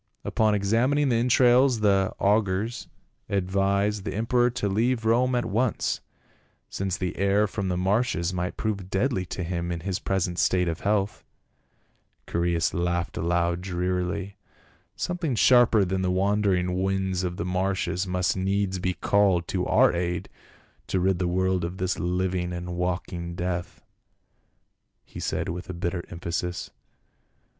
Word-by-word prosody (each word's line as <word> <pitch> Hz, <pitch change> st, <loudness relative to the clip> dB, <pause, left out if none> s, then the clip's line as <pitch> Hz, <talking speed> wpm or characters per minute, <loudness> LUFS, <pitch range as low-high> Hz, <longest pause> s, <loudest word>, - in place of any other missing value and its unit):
Upon 110 Hz, -1 st, +2 dB
examining 120 Hz, +8 st, +2 dB
the 120 Hz, -, +2 dB
entrails 125 Hz, 0 st, +4 dB
the 95 Hz, -2 st, +3 dB
augurs 105 Hz, +2 st, 0 dB, 0.4 s
ad 95 Hz, -2 st, -1 dB
vised 100 Hz, +1 st, +1 dB
the -, -, -4 dB
emperor 120 Hz, +3 st, +2 dB
to 120 Hz, -4 st, -2 dB
leave 115 Hz, +4 st, 0 dB
Rome 125 Hz, +3 st, +3 dB
at 120 Hz, -, 0 dB
once, 115 Hz, +3 st, 0 dB, 0.7 s
since 95 Hz, -1 st, -2 dB
the 90 Hz, -3 st, -3 dB
air 100 Hz, +2 st, +3 dB
from 100 Hz, -2 st, -3 dB
the 90 Hz, -1 st, -1 dB
marshes 95 Hz, -2 st, +1 dB
might 90 Hz, 0 st, -3 dB
prove 100 Hz, -4 st, -3 dB
deadly 95 Hz, -2 st, 0 dB
to 90 Hz, -, -4 dB
him 85 Hz, 0 st, -3 dB
in 85 Hz, -1 st, -3 dB
his 95 Hz, +2 st, -2 dB
present 90 Hz, -2 st, -1 dB
state 90 Hz, -1 st, +2 dB
of 80 Hz, -1 st, -2 dB
health." 100 Hz, 0 st, 0 dB, 1.0 s
Chaereas 85 Hz, -1 st, 0 dB
laughed 85 Hz, 0 st, -1 dB
aloud 85 Hz, 0 st, 0 dB
drearily. 90 Hz, +2 st, -2 dB, 0.3 s
" -, -, -35 dB
Something 175 Hz, -7 st, -2 dB
sharper 115 Hz, -1 st, +5 dB
than 95 Hz, +1 st, -1 dB
the 95 Hz, -, 0 dB
wandering 95 Hz, -1 st, +1 dB
winds 95 Hz, -1 st, 0 dB
of 90 Hz, 0 st, -3 dB
the -, -, -3 dB
marshes 95 Hz, 0 st, -1 dB
must 90 Hz, 0 st, 0 dB
needs 95 Hz, 0 st, 0 dB
be 90 Hz, 0 st, -1 dB
called 95 Hz, -1 st, +2 dB
to -, -, -1 dB
our -, -, +4 dB
aid 85 Hz, 0 st, -2 dB, 0.6 s
to 95 Hz, -, 0 dB
rid 95 Hz, 0 st, +1 dB
the 90 Hz, -, 0 dB
world 95 Hz, 0 st, +1 dB
of 85 Hz, +2 st, -4 dB
this 95 Hz, 0 st, 0 dB
hving 90 Hz, 0 st, -1 dB
and 90 Hz, 0 st, -5 dB
walking 90 Hz, -1 st, -3 dB
death," 90 Hz, -1 st, -4 dB, 1.2 s
he -, -, -10 dB
said -, -, -2 dB
with 90 Hz, 0 st, -5 dB
bitter 85 Hz, 0 st, -2 dB
emphasis. 85 Hz, 0 st, -4 dB
95 Hz, 150 wpm, -26 LUFS, 90-105 Hz, 1.2 s, sharper